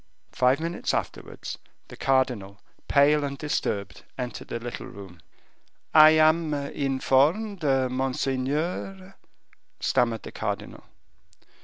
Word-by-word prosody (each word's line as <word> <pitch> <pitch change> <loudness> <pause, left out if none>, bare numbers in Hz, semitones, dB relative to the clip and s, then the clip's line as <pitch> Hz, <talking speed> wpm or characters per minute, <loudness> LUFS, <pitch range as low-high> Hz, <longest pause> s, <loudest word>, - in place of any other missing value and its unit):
Five 130 +3 +2
minutes 165 +2 -2
afterwards, - - -5 0.3
the - - -10
cardinal, 125 -7 0 0.3
pale 145 +1 +4
and 140 -1 -3
disturbed, 105 -9 -3
entered 125 -2 -5
the 115 - -4
little 120 +1 -6
room. 95 -4 -11 0.7
"I 155 0 +9
am 155 0 +3
informed, 140 +8 +1
monseigneur, 135 +7 -1 0.3
" - - -35
stammered 115 -2 +1
the - - -8
cardinal. - - -5
135 Hz, 105 wpm, -26 LUFS, 125-155 Hz, 0.7 s, I